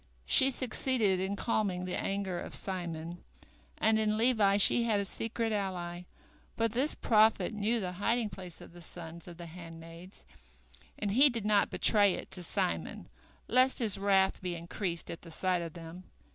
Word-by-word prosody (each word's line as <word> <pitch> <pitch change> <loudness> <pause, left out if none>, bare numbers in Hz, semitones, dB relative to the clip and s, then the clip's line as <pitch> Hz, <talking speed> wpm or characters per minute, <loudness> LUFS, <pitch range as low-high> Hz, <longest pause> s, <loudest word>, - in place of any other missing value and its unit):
She 260 - +5
succeeded 245 -6 0
in 190 +2 -2
calming 200 -4 -1
the 180 - -3
anger 195 -3 -2
of - - -4
Simon, 175 -2 -5 0.5
and 220 0 +3
in 215 0 +1
Levi 220 -4 +3
she 205 +4 +5
had 215 -3 +1
a 200 - -2
secret 225 +2 -3
ally, 180 -4 -4 0.5
for 230 - +2
this 255 +7 -1
prophet 220 0 +3
knew 215 +3 0
the 185 -4 -3
hiding 215 +4 -1
place 180 -3 -9
of - - -13
the 175 - -13
sons 170 0 -10
of 170 -1 -10
the 175 - -8
handmaids, 165 +1 -11 0.7
and 205 -2 -2
he 270 +7 +5
did 230 -4 -4
not 210 -1 +3
betray 205 -3 +4
it - - -9
to 180 - -1
Simon, 85 - -2 0.4
lest 255 +2 +4
his 210 -5 +4
wrath 195 -1 +2
be 180 -2 -3
increased 170 +1 -5
at 170 - -8
the 170 - -12
sight 180 +2 -1
of 165 -2 -6
them. 170 +2 -10
195 Hz, 175 wpm, -31 LUFS, 175-220 Hz, 0.7 s, She